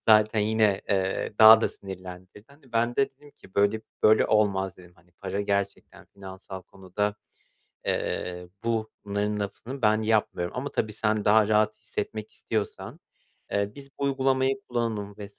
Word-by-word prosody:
zaten 110 0 +5
yine, 105 -2 +2
eee, 95 +1 0
daha 110 0 +10
da - - +1
sinirlendirdi. 95 +1 -10
Hani, 140 -3 -21
ben 120 +1 +1
de 135 - +2
dedim 145 +2 -19
ki 95 - -20
böyle 100 +2 +2 0.2
böyle 110 +1 +5
olmaz 100 -3 +1
dedim, 90 -1 -16
hani, 85 0 -26
para 100 +2 -4
gerçekten 100 -1 -3
finansal 95 -1 -9
konuda, 100 +2 -3 0.7
eee, 90 0 -2 0.2
bunların 105 -2 -2
lafını 120 +7 -6
ben 110 0 +3
yapmıyorum 105 -5 0
ama, 140 +3 -2
tabii, 110 -5 -2
sen 110 0 0
daha 105 0 +5
rahat 110 0 +3
hissetmek 110 0 -5
istiyorsan, 110 -2 -4 0.5
eee, 100 0 0
biz 140 -1 -11
bu 140 - -2
uygulamayı 135 0 +1
kullanalım 110 -4 -2
vs. 100 0 -10
105 Hz, 150 wpm, -27 LUFS, 100-110 Hz, 0.7 s, daha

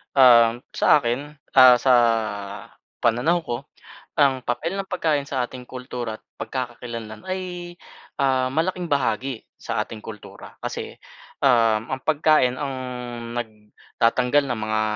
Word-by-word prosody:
Um, 120 -3 +6
sa - - +5
akin, 140 +4 -3 0.2
ah, 130 -1 +10
sa 130 +1 +3 1.1
pananaw 125 +10 +2
ko 120 -5 -3 0.6
ang 135 -3 +4
papel 165 +10 -2
ng 195 - -4
pagkain 155 -6 0
sa 130 -3 -1
ating 125 0 -11
kultura 125 -3 -5
at - - -41 0.2
pagkakakilanlan 120 - -6
ay, 180 -2 -5 0.4
ah, 130 -2 +2
malaking 175 +4 -1
bahagi 130 -4 -1 0.2
sa - - -2
ating 110 - -10
kultura. 105 -1 -11
Kasi, - - -5 0.5
um, 115 -3 +3
ang 130 0 -3
pagkain 155 -4 +3
ang 135 0 -4 0.6
nagtatanggal 115 +4 0
ng 120 - -2
mga 110 0 0
130 Hz, 125 wpm, -23 LUFS, 115-145 Hz, 1.1 s, ah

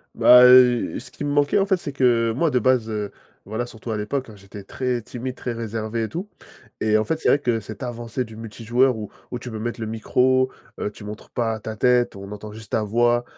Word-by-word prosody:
Bah, 125 0 +8
heu, 125 -1 +6
ce - - -12
qui - - -7
me 145 - -1
manquait, 145 +6 +3
en 195 - +1
fait, 190 -2 +3
c'est 170 -4 -6
que 120 -4 +3
moi 165 +5 +2
de 130 - +1
base, 125 -2 +2
heu- 105 -2 -3 0.3
voilà, 110 +4 -3
surtout 115 -1 -8
à 110 - -1
l'époque, 120 +5 -3
hein- 110 - -12
j'étais 100 0 -11
très 125 +4 -2
timide, 125 +2 -6
très 125 - -4
réservé 115 0 -3
et 110 - -3
tout, 180 +5 -5 0.5
et 110 0 +3
en 110 - +1
fait, 160 +7 -1
c'est - - +1
vrai 145 - +4
que 120 -5 0
cette 110 +1 -9
avancée 120 0 -4
du 110 -1 -12
multijoueur 115 +3 0
où 105 -2 -7 0.2
où 125 - -3
tu 125 - -8
peux 110 - -5
mettre 120 +2 -4
le 110 - -3
micro, 130 +4 +2 0.3
heu, - - -1
tu 105 - -13
montres 105 +1 -9
pas 115 -2 -1
ta 110 +1 -6
tête, 125 0 +2
on 100 0 -9
entend 105 +1 -8
juste 110 0 -12
ta 110 - +1
voix, 120 +3 +2
115 Hz, 240 wpm, -23 LUFS, 110-125 Hz, 0.5 s, Bah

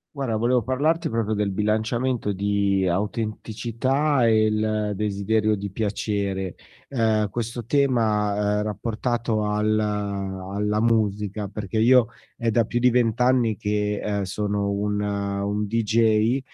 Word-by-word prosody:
Guarda, 130 -6 -2
volevo 120 +2 +2
parlarti 145 +7 0
proprio 115 -1 -1
del 105 -1 0
bilanciamento 110 +3 0
di 100 -1 +1
autenticità 115 - 0
e 110 -1 +4
il 110 0 0
desiderio 105 +1 0
di 100 -1 -5
piacere. 100 -2 -2 0.4
Ehm, 110 -5 +1
questo 115 0 -4
tema, 105 -6 +1
ehm, - - 0
rapportato 110 +1 -2
al 105 +1 0
alla 100 0 -2
musica, 105 -3 0
perché 105 +1 -4
io 120 +1 +5 0.3
è 115 -1 0
da 115 +1 +3
più 120 +2 -1
di 125 +1 +4
20 120 -1 +1
anni 125 -4 +3
che, 105 -1 -1
ehm, 100 -1 -1
sono 100 +1 -2
un 105 +1 -1
un 100 0 -2
dj, 115 +2 +2
105 Hz, 125 wpm, -24 LUFS, 100-115 Hz, 0.4 s, io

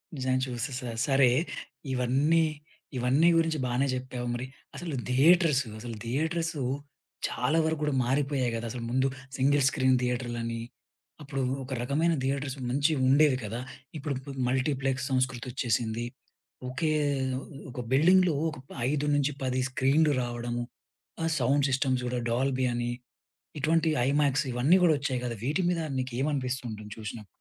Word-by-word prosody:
నిజంగా 130 -1 0
చూస్తేస. 125 +2 -4 0.3
సరే! 135 -3 +5 0.6
ఇవన్నీ 140 +6 +3 0.5
ఇవన్నీ 135 +7 +4
గురించి 160 -2 +1
బానే 125 +3 +1
జెప్పావు 125 -1 -4
మరి. 120 +2 -3 0.3
అసలు 155 0 -4
థియేటర్స్ 150 +1 +5 0.2
అసలు 115 0 -6
థియేటర్స్ 160 +7 -1 0.7
చాలా 155 +6 0
వరకు 160 -1 0
గూడా 150 -2 +1
మారిపోయాయి 135 -1 +1
గదా 115 +1 -3
అసలు! 120 -2 -5
ముందు 130 +2 +2 0.3
సింగిల్ 140 +2 +3
స్క్రీన్ 130 -3 +3
థియేటర్‌లని 120 -2 -2 0.6
అప్పుడు 135 -1 -3 0.2
ఒక 130 - -10
రకమైన 155 +7 +1
థియేటర్స్ 140 0 -1
మంచివి 145 +2 +2
ఉండేవి 140 -1 +5
కదా! 115 +4 -4 0.4
ఇప్పుడు 145 -1 -2 0.3
మల్టీప్లెక్స్ 130 0 0
సంస్కృతొచ్చేసింది. 120 -3 -1 0.6
ఒకే 155 +4 0 0.8
ఒక 125 - -7
బిల్డింగ్‌లో 175 +5 +5 0.2
ఒక 155 - -8 0.3
5 150 0 0
నుంచి 145 0 +2
10 130 0 0
స్క్రీన్‌లు 140 +4 +3
రావడము. 120 0 -3 0.6
ఆ - - +1
సౌండ్ 135 +3 +3
సిస్టమ్స్ 130 -1 +1
కూడా 125 0 -1
డాల్బీ 130 +1 +1
అని 120 0 -1 0.7
ఇటువంటి 160 +3 +2 0.2
ఐమాక్స్ 140 0 +2
ఇవన్నీ 130 +9 +4
గూడా 165 -3 +6
ఒచ్చాయి 130 -3 -1
కదా! 120 -1 -3
వీటి 150 +8 +1
మీద 170 -2 0 0.2
నికేమనిపిస్తుంది 130 -1 -2
ఉంటుంది 105 -1 -8
చూసినప్పుడు? 110 0 -7
130 Hz, 130 wpm, -28 LUFS, 125-145 Hz, 0.8 s, గూడా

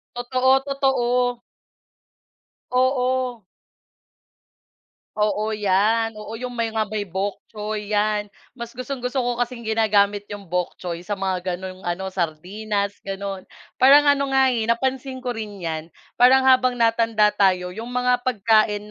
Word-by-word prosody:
Totoo, 255 +2 +2
totoo. 250 -3 0 1.3
Oo. 255 -2 0 1.7
Oo 215 +1 0
yan, 210 +3 +2
oo 210 +1 -8
,yung 250 +2 -5
may 225 -1 -1
nga 220 - +1
may 210 -1 -3
bok 195 +2 -3
choy 210 -1 -5
yan, 210 0 +1 0.2
mas 235 -2 -9
gustong-gusto 255 0 -3
ko 245 -1 -2
kasing 245 0 -3
ginagamit 205 -2 +2
yung 205 0 -8
bok 180 -1 -1
choy 175 -2 -6
sa 205 - -1
mga 185 -2 -2
ganung 185 0 -8
ano, 190 +2 -3
sardinas 200 +4 -3
ganun. 195 -1 -6 0.3
Parang 285 +3 +7
ano 280 -1 0
nga 265 -1 +5
eh 230 -3 -1
napansin 260 +2 -1
ko 250 - -2
rin 210 -4 -6
yan 160 -1 -3 0.3
parang 260 +2 +6
habang 255 -1 +4
natanda 225 -2 +3
tayo, 185 -3 +1
'yung 230 +6 -7
mga 250 0 +1
pagkain 215 -2 +2
220 Hz, 135 wpm, -22 LUFS, 200-250 Hz, 1.7 s, Parang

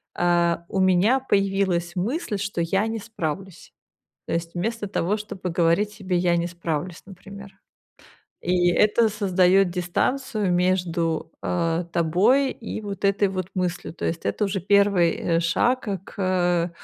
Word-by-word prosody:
"Э, 175 -1 +2
у 195 - -2
меня 190 +7 +4
появилась 195 -6 0
мысль, 225 - -2
что 195 -3 -3
я 195 +5 +1
не 225 0 -3
справлюсь". 190 -4 -6 0.5
То - - -4
есть, 170 0 -3
вместо 210 +4 -3
того, 195 +1 0
чтобы 200 -3 -6
говорить 170 +5 +2
себе: 195 -4 -3
"Я 175 -1 +2
не 170 0 -1
справлюсь", 170 -1 -4
например. 200 +1 -12 0.9
И 175 0 +2
это 215 +5 +3
создаёт 195 -2 +3
дистанцию 205 +4 -1
между, 175 -3 0
а, 170 -1 0
тобой 185 - +2
и 220 -1 -7
вот 200 -1 -6
этой 200 0 +2
вот 185 -2 -4
мыслью. 180 -2 -3
То - - -6
есть, 165 0 -3
это 210 - 0
уже 195 -1 -2
1 200 -3 +3
э, 165 -1 0
шаг 245 +9 +1
к 200 -3 -3
к 180 -3 0
185 Hz, 145 wpm, -24 LUFS, 175-205 Hz, 0.9 s, меня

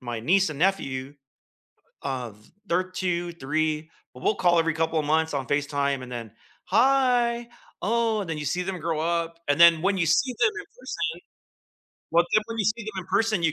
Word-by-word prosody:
my 120 -2 -5
niece 185 +7 +3
and 145 - -7
nephew, 140 -7 0 0.9
uh, 130 -4 -3
th 105 +1 -22 0.2
they're 180 +2 +2
2, 175 -2 -2
3, 155 +1 -1 0.2
but 125 - -13
we'll - - +2
call 175 -2 +3
every 165 0 +1
couple 160 0 0
of 150 - -2
months 160 +1 +1
on 135 -3 -2
FaceTime, 140 -1 0
and 125 - -9
then, 115 -3 -6 0.3
“Hi, 245 -2 +3 0.3
oh," 225 +1 +1
and 190 - -6
then 160 - -2
you 150 - -4
see 175 +6 -1
them 185 -1 -4
grow 160 -1 -2
up; 165 0 -1
and 145 +2 +1
then 170 -2 +7
when 195 +1 +1
you 170 - +1
see 250 +11 +2
them 435 0 +4
in 410 - -8
person 480 - -3 1.0
well, 170 +1 +4
then 215 - +4
when 230 0 -6
you 210 - +1
see 215 +4 0
them 205 -3 -5
in - - -10
person, 200 -1 +1
you 160 - +2
170 Hz, 205 wpm, -25 LUFS, 150-200 Hz, 1.0 s, then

